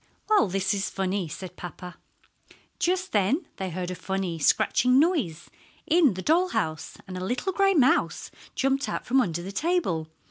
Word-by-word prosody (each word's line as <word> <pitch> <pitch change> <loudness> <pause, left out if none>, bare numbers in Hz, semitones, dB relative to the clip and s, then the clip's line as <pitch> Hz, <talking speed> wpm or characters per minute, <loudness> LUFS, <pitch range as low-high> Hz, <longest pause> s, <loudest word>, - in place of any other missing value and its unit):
"Well, 430 - +4
this 195 +2 0
is 195 -1 -1
funny," 190 -1 -2
said 180 +3 -8
papa. 180 0 -9 0.8
Just 370 +1 0
then 225 - +1
they 190 -1 -3
heard 180 +1 -4
a - - -2
funny, 190 -2 -3
scratching 250 - +3
noise 275 - +1 0.4
in 310 - +4
the 185 - -5
doll 345 +4 +3
house, 155 - -3
and 185 -1 -6
a - - -5
little 250 - -2
gray 390 +1 +3
mouse 265 -4 +2 0.2
jumped 270 +1 0
out - - -4
from 260 +2 +3
under 175 -6 -2
the 195 - -6
table. 200 - 0
195 Hz, 170 wpm, -26 LUFS, -, 0.8 s, Well